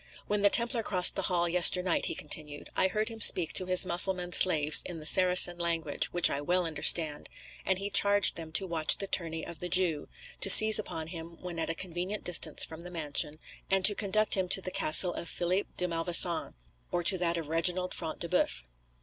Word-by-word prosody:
"When 210 0 -4
the 200 - +2
Templar 235 +2 +2
crossed 180 -4 +3
the - - -4
hall 175 -1 -2
yesternight," 180 +1 +2
he - - -6
continued, 150 -1 -5
"I 190 - 0
heard 215 +4 -5
him 225 -1 -12
speak 175 -5 +6
to 185 - -4
his 185 +1 +4
Mussulman 180 0 0
slaves 155 -5 +4
in 175 - -10
the 155 - -12
Saracen 180 0 +5
language, 165 -3 -3
which 175 -1 +2
I 140 - -6
well 180 +4 -3
understand, 155 -1 0 0.4
and 190 - -1
he 200 +1 -7
charged 200 0 +2
them 160 -1 -11
to 195 - -1
watch 165 -3 +1
the 200 - -6
journey 165 -4 -5
of 170 - -12
the 180 - -4
Jew, 175 -4 -2 0.3
to - - +1
seize 215 +2 +8
upon 160 -6 -8
him 165 -1 -12
when 175 -2 -10
at 160 - -6
a 165 - -5
convenient 185 +4 -7
distance 165 -3 +1
from 160 +1 -14
the 175 - -12
mansion, 150 -3 -2 0.3
and 195 -1 -1
to 210 - +6
conduct 215 +1 -2
him 185 -2 -2
to 195 +1 0
the 185 - -7
castle 175 +3 +1
of 170 - -8
Philip 180 +3 -4
de 180 - 0
Malvoisin, 170 - -1 0.4
or 175 - -4
to 185 +1 +3
that 170 -1 -2
of 165 -3 -8
Reginald 180 +3 -2
Front 160 -2 -7
de 170 - -6
Boeuf." 65 - -4
175 Hz, 210 wpm, -26 LUFS, 165-190 Hz, 0.4 s, seize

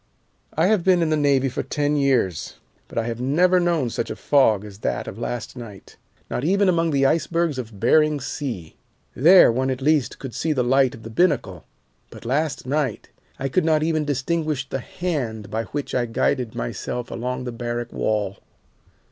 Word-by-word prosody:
I 160 - +4
have 200 -2 +3
been 180 -2 +4
in 160 - 0
the - - +3
Navy 140 -3 +2
for 130 - -3
ten 145 0 -1
years, 130 - 0 0.3
but - - -11
I 115 - +2
have 120 0 -4
never 175 +8 +3
known 170 -8 +1
such - - -3
a - - -4
fog 110 -8 +3
as 100 -1 -11
that - - -2
of 100 - -7
last 120 0 -4
night, 110 -6 -11 0.3
not 125 - -3
even 195 +5 +3
among 165 -2 +2
the 140 -2 +2
icebergs 165 0 +1
of 110 -5 -8
Behring 150 +5 +3
Sea. 125 - -5 0.4
There 170 +2 +7
one 130 +3 0
at 130 -1 -2
least 145 -1 +1
could 135 -4 -8
see 160 - -1
the 130 -3 +1
light 130 0 +3
of 115 - -14
the 115 - -8
binnacle, 135 - 0 0.4
but - - -13
last 135 +1 -1
night 135 -3 -2 0.3
I 135 - -2
could 170 +7 +1
not 155 -1 +2
even 155 -1 +1
distinguish 145 0 -1
the 135 - -3
hand 125 - -4
by 115 +1 -2
which 145 +3 -5
I 120 -1 0
guided 120 +1 -1
myself 120 - -4
along 125 +2 -3
the 125 - -4
barrack 120 0 -4
wall. 105 -3 -1
135 Hz, 190 wpm, -23 LUFS, 120-155 Hz, 0.4 s, There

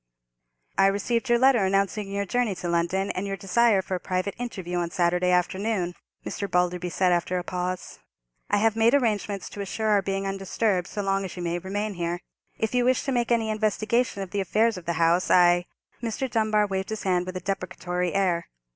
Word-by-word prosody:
"I 195 - +7
received 230 +5 0
your 240 - +5
letter 255 -3 +4
announcing 195 +1 0
your 200 0 -1
journey 235 -1 0
to 180 0 -5
London, 175 +3 0
and 190 +2 -3
your 195 0 -3
desire 200 0 +3
for 190 - -5
a 185 - 0
private 185 +2 -2
interview, 190 -8 -4
on 170 -1 -1
Saturday 180 0 +1
afternoon," 180 +1 0 0.3
Mr. 200 - -4
Balderby 180 0 0
said, 180 +3 +2
after 175 +1 +1
a 180 - -2
pause. 180 0 -4 0.5
"I - - +3
have 220 +1 +2
made 225 +4 +4
arrangements 210 -6 0
to 205 - -6
assure 215 +3 -2
our 205 -1 +4
being 195 0 -2
undisturbed 195 -1 -1
so 205 - -4
long 195 0 0
as 190 -1 -7
you 175 - -4
may 170 0 -1
remain 205 +3 -3
here. 175 -1 -2 0.4
If 220 +1 -1
you 250 0 +3
wish 255 +1 +2
to 275 - -2
make 240 -2 0
any 225 -2 +2
investigation 215 0 0
of 185 - -9
the 205 - 0
affairs 220 +4 +2
of 180 -2 -9
the 170 - +1
house, 170 +2 +2
I——" 175 0 +5 0.3
Mr. 235 +3 -2
Dunbar 215 -3 +2
waved 190 -1 -3
his 220 -1 -4
hand 180 -1 +1
with 185 0 -4
a - - -3
deprecatory 180 -1 -3
air. 180 -4 +1
195 Hz, 205 wpm, -26 LUFS, 180-215 Hz, 0.5 s, I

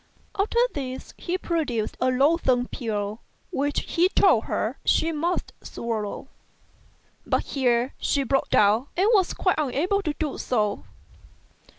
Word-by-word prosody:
After 415 +3 -1 0.2
this 260 -2 -6
he 360 +1 -3
produced 295 -12 -2
a 255 - +3
loathsome 260 -2 +2
pill 210 -3 -3 0.3
which 290 +2 0
he 355 +2 +1
told - - +4
her - - -2
she 325 - +2
must 335 +3 -2
swallow, 225 +1 -4 1.0
but - - 0
here 245 -2 0
she 280 - +1
broke 270 +1 0
down 210 +6 +3
and 380 +3 +3
was 380 -4 +3
quite 365 -4 +1
unable 310 +8 0
to 305 -6 -2
do 305 -3 -3
so. 210 -4 -1
275 Hz, 130 wpm, -25 LUFS, 235-335 Hz, 1.0 s, told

